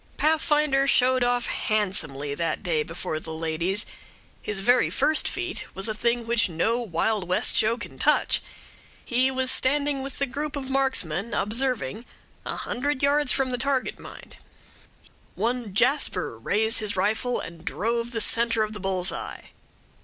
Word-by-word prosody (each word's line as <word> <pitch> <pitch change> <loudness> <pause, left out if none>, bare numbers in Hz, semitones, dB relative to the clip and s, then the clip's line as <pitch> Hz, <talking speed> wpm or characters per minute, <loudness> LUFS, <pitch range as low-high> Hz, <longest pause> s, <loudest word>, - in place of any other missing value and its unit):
Pathfinder 300 -3 +2
showed 255 -1 +3
off 245 -1 +1
handsomely 155 -10 -1
that 165 +6 -2
day 165 -4 +1
before 165 0 -4
the 160 - -8
ladies. 165 +5 -1 0.6
His 210 -2 -2
very 245 +5 +4
first 310 0 +2
feat 365 0 -3
was 195 +2 -1
a 215 - -1
thing 235 +2 0
which 230 -2 +2
no 200 +9 0
Wild 210 -1 -1
West 180 - +1
show 225 +2 +3
can - - -9
touch. - - +3 0.6
He 255 +2 +2
was 260 -1 +1
standing 285 +1 +2
with 270 0 -7
the 280 - +1
group 285 +3 -4
of 270 -2 -5
marksmen, 235 - 0
observing 230 - 0 0.4
a - - -3
hundred 280 +2 -2
yards 285 -1 +3
from 265 -2 +1
the 250 - -2
target, 270 0 0
mind; - - -12 1.0
one 240 -2 -1
Jasper 245 +8 +2
raised 220 +2 +1
his 215 -1 -1
rifle 220 +6 0
and 165 -1 -9
drove 230 +4 -1
the 225 -2 -1
centre 230 +1 +3
of 215 0 -4
the 210 - -7
bull's 190 -1 -1
eye. - - -7
235 Hz, 155 wpm, -25 LUFS, 195-265 Hz, 1.0 s, very